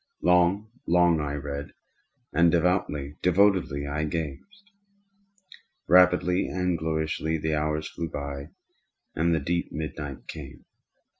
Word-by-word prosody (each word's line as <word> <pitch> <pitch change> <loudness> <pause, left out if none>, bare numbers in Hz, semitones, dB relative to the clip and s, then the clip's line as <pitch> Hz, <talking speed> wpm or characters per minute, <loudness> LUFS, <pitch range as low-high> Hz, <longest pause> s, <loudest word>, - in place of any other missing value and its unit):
Long, 90 +4 +3 0.2
long 85 -1 +4
I 75 -1 -3
read—and 70 +3 -3
devoutly, 80 -5 0
devotedly 90 -6 +2
I 75 +2 -2
gazed. 85 - -6 1.2
Rapidly 90 0 +4
and 90 -1 -1
gloriously 80 0 -1
the 80 0 -2
hours 75 0 -1
flew 85 -1 -5
by 70 0 -6 0.6
and 85 +2 +1
the - - +1
deep 85 +1 -2
midnight 75 -3 -6
came. - - -9
80 Hz, 105 wpm, -26 LUFS, 75-90 Hz, 1.2 s, long